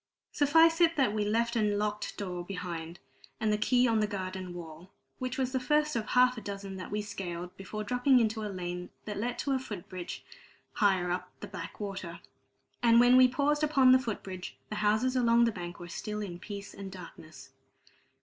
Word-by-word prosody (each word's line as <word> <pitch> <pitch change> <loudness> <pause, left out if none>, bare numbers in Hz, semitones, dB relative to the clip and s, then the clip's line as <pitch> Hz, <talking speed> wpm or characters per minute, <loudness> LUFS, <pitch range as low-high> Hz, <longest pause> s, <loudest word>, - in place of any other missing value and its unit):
Suffice 325 +3 +4
it 335 -1 +5
that 265 -8 +2
we 215 -1 0
left 230 +3 +1
a 230 - +2
locked 210 0 -1
door 180 -3 -4
behind 175 -3 -6
us, 135 -3 -27
and 215 -1 +1
the - - +2
key 250 +3 +3
on 225 -1 +2
the 210 - +2
garden 185 -2 -5
wall, 170 0 -9 0.3
which 255 -1 -3
was 260 -1 0
the 260 - 0
first 300 +3 +1
of 220 -2 -2
half 250 -1 +4
a - - -12
dozen 200 -1 -6
that 185 - -7
we 210 0 -2
scaled 180 -4 -6
before 210 +2 -6
dropping 250 +4 +3
into 220 -1 0
a 210 - -3
lane 180 -2 -5 0.2
that 210 -2 -4
led 240 +3 -2
to 280 - -2
a 265 - +2
foot 205 -8 -7
bridge 180 -2 -7 0.5
higher 190 -4 +2
up 180 0 -3
the - - -4
backwater. 190 -1 -6 0.6
And 235 -1 +6
when 245 +1 +6
we 255 0 +8
paused 290 +4 +1
upon 275 -4 +5
the 260 - +7
foot 230 -5 -4
bridge, 185 -1 -7
the 215 - -4
houses 215 +5 +2
along 235 -1 +4
the 230 - +2
bank 175 -3 -7
were 175 - -8
still 210 +4 -5
in 175 -3 -6
peace 200 0 -8
and 195 -1 -8
darkness. 155 -7 -11
210 Hz, 205 wpm, -30 LUFS, 185-250 Hz, 0.6 s, we